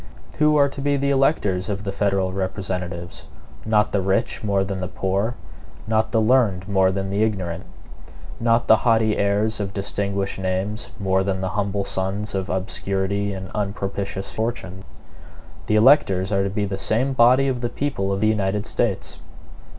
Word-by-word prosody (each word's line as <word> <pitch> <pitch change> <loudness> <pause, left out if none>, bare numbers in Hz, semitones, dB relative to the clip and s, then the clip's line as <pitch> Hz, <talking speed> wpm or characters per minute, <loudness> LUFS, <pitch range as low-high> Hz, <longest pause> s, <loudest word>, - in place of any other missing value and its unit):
Who 150 0 +4
are 140 -1 +5
to 140 0 -7
be 145 0 +1
the 140 0 0
electors 105 - +1
of 100 0 -3
the 100 - -3
federal 95 -2 0
representatives? 90 -2 -4 0.4
Not 105 -1 +2
the 100 - +1
rich, 95 +3 0
more 100 -2 +1
than 95 -1 -4
the 90 - -2
poor; 100 +7 -1 0.5
not 110 0 +1
the 115 - +2
learned, 110 -5 +2
more 95 -2 +3
than 95 0 -3
the 100 +2 0
ignorant; 95 -6 -1 0.7
not 115 0 +2
the 110 - +7
haughty 110 -2 +2
heirs 105 +2 +1
of 100 0 -4
distinguished 100 -1 -2
names, 95 +5 -2
more 95 -1 +1
than 95 -1 -2
the 95 - -1
humble 100 0 -1
sons 100 +2 -2
of 95 -1 -2
obscurity 95 +1 -1
and 95 -1 -7
unpropitious 100 -1 -3
fortune. 95 -5 -4 0.8
The 105 - +2
electors 105 -6 +4
are 100 -1 +2
to 100 - -1
be 105 +1 -1
the 95 0 -3
great 130 +5 +1
body 130 +3 +5
of 125 -2 -1
the 120 - -1
people 120 -10 -2
of 100 0 -1
the 110 - +3
United 105 -1 0
States. 110 -6 -1
100 Hz, 170 wpm, -22 LUFS, 95-110 Hz, 0.8 s, the